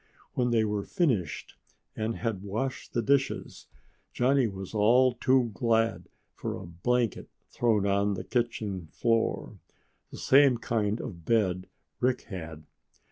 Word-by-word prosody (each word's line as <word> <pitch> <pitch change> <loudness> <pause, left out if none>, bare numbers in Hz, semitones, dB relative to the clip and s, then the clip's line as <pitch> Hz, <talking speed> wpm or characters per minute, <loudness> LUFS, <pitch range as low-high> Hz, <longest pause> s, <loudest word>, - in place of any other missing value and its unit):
When 125 -1 +1
they 115 -2 +3
were 105 -1 -1
finished 105 - -1 0.4
and 110 +1 -2
had 110 -5 -3
washed 110 +7 -4
the 120 - 0
dishes, 135 +3 0 0.5
Johnny 130 0 +3
was 95 -1 -7
all 120 +4 +4
too 125 -1 +2
glad 115 +2 +1 0.2
for - - -4
a - - -8
blanket 115 +8 -1 0.2
thrown 110 -4 +2
on 100 0 +2
the - - -5
kitchen 110 -7 -2
floor 115 +6 -1 0.5
the - - -10
same 135 -2 +5
kind 110 -1 -1
of 85 -8 -7
bed 95 -4 +1 0.3
Rick 125 0 +1
had. 80 -6 -8
115 Hz, 135 wpm, -28 LUFS, 100-125 Hz, 0.5 s, same